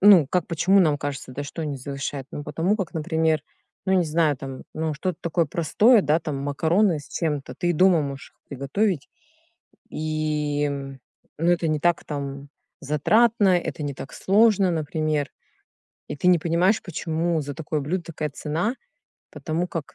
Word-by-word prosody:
Ну 190 Hz, -7 st, +8 dB
как, 180 Hz, +5 st, 0 dB
почему 180 Hz, +4 st, +3 dB
нам 155 Hz, -4 st, +3 dB
кажется, 140 Hz, -2 st, -5 dB
да, 145 Hz, -, -4 dB
что 160 Hz, +3 st, -6 dB
они 145 Hz, -3 st, -3 dB
завышают? 135 Hz, 0 st, -5 dB
Ну, 145 Hz, -, -6 dB
потому 185 Hz, +6 st, 0 dB
как, 195 Hz, -5 st, -4 dB
например, 160 Hz, -1 st, +1 dB, 0.4 s
ну, 190 Hz, -, +2 dB
не 180 Hz, -2 st, +3 dB
знаю 155 Hz, -2 st, +2 dB
там, 135 Hz, 0 st, -7 dB
ну, 155 Hz, -1 st, -2 dB
что-то 180 Hz, +2 st, -3 dB
такое 170 Hz, -1 st, 0 dB
простое, 200 Hz, -, +4 dB
да, 155 Hz, +3 st, +2 dB
там 150 Hz, -3 st, -4 dB
макароны 160 Hz, +5 st, +1 dB
с 145 Hz, -, -15 dB
чем-то, 145 Hz, -6 st, -3 dB
ты 175 Hz, -, +1 dB
и -, -, +3 dB
дома 175 Hz, -1 st, +4 dB
можешь 140 Hz, -1 st, -6 dB
их -, -, -41 dB
приготовить, 145 Hz, +5 st, -1 dB, 0.8 s
и, 150 Hz, -2 st, -1 dB
ну, 140 Hz, +4 st, -4 dB
это 170 Hz, -1 st, +1 dB
не 155 Hz, -1 st, 0 dB
так 175 Hz, +1 st, +2 dB
там 140 Hz, -1 st, -5 dB, 0.3 s
затратно, 190 Hz, -, +3 dB
это 165 Hz, -, -4 dB
не 140 Hz, -1 st, -3 dB
так 130 Hz, -, -9 dB
сложно, 200 Hz, -2 st, +3 dB
например, 155 Hz, -2 st, -1 dB, 0.8 s
и -, -, -5 dB
ты 180 Hz, -, 0 dB
не 180 Hz, -2 st, +6 dB
понимаешь, 175 Hz, +6 st, +2 dB
почему 165 Hz, -1 st, -1 dB
за 145 Hz, 0 st, -5 dB
такое 155 Hz, 0 st, -3 dB
блюдо 170 Hz, +6 st, -2 dB
такая 155 Hz, -2 st, -4 dB
цена, 165 Hz, -, -2 dB, 0.6 s
потому 165 Hz, +2 st, -2 dB
как, 165 Hz, -5 st, -6 dB
155 Hz, 170 wpm, -24 LUFS, 145-175 Hz, 0.8 s, Ну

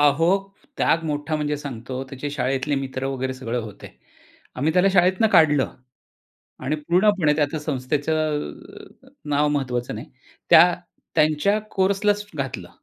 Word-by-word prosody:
अहो, 145 Hz, +3 st, +4 dB, 0.5 s
त्याग 165 Hz, -, +2 dB
मोठा 150 Hz, 0 st, -2 dB
म्हणजे 150 Hz, -1 st, -1 dB
सांगतो, 130 Hz, -2 st, -6 dB
त्याचे 140 Hz, +2 st, -5 dB
शाळेतले 135 Hz, +1 st, -1 dB
मित्र 135 Hz, -1 st, -3 dB
वगैरे 130 Hz, -1 st, -3 dB
सगळं 125 Hz, -2 st, -3 dB
होते. 105 Hz, -2 st, -10 dB, 0.7 s
आम्ही 150 Hz, +5 st, 0 dB
त्याला 180 Hz, +2 st, +4 dB
शाळेतनं 185 Hz, +3 st, +4 dB
काढलं 155 Hz, -7 st, +4 dB, 0.9 s
आणि 150 Hz, +4 st, 0 dB
पूर्णपणे 175 Hz, +1 st, +2 dB
त्या 150 Hz, +1 st, 0 dB
संस्थेचं 150 Hz, +2 st, -1 dB, 0.5 s
अ, -, -, -18 dB, 0.2 s
नाव 145 Hz, +1 st, +2 dB
महत्वाचं 125 Hz, -4 st, -2 dB
नाही. -, -, -7 dB, 0.4 s
त्या -, -, +8 dB, 0.4 s
त्यांच्या 155 Hz, +7 st, +2 dB
कोर्सलाच 205 Hz, +2 st, +1 dB
घातलं. 130 Hz, -11 st, -5 dB
145 Hz, 125 wpm, -23 LUFS, 135-160 Hz, 0.9 s, त्या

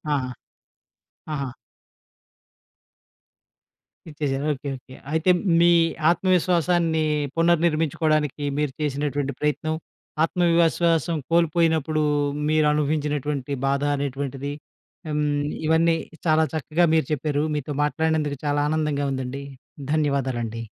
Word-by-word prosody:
ఆహా! 130 Hz, -2 st, -2 dB, 1.0 s
ఆహా! 140 Hz, -2 st, -2 dB, 2.6 s
ఇచ్చేసారు. 145 Hz, -2 st, -2 dB
Okay, 140 Hz, +1 st, -6 dB
okay. 130 Hz, 0 st, -15 dB, 0.2 s
అయితే 160 Hz, +3 st, +3 dB, 0.3 s
మీ 170 Hz, +1 st, +6 dB, 0.4 s
ఆత్మవిశ్వాసాన్ని 175 Hz, -2 st, +2 dB, 0.3 s
పునర్నిర్మించుకోవడానికి 155 Hz, -3 st, +1 dB
మీరు 150 Hz, -2 st, 0 dB
చేసినటువంటి 145 Hz, -1 st, -1 dB
ప్రయత్నం 155 Hz, +1 st, -1 dB, 0.5 s
ఆత్మవిశ్వాసం 170 Hz, -1 st, +2 dB, 0.2 s
కోల్పోయినప్పుడు 160 Hz, -2 st, +2 dB, 0.5 s
మీరు 155 Hz, 0 st, +3 dB
అనుభవించినటువంటి 150 Hz, -2 st, -1 dB, 0.2 s
బాధ 140 Hz, +1 st, +1 dB
అనేటువంటిది 140 Hz, 0 st, -3 dB, 0.6 s
ఆహ్, -, -, -2 dB
హ్మ్, 145 Hz, -1 st, 0 dB, 0.2 s
ఇవన్నీ 165 Hz, +1 st, +3 dB, 0.3 s
చాలా 160 Hz, -1 st, +4 dB
చక్కగా 160 Hz, +3 st, +1 dB
మీరు 160 Hz, -2 st, +3 dB
చెప్పారు. 150 Hz, 0 st, 0 dB
మీతో 145 Hz, 0 st, -3 dB
మాట్లాడినందుకు 155 Hz, -1 st, 0 dB
చాలా 145 Hz, 0 st, +1 dB
ఆనందంగా 150 Hz, -2 st, 0 dB
ఉందండి. 130 Hz, +1 st, -4 dB, 0.5 s
ధన్యవాదాలండి. 130 Hz, -7 st, -1 dB
150 Hz, 90 wpm, -24 LUFS, 140-160 Hz, 2.6 s, మీ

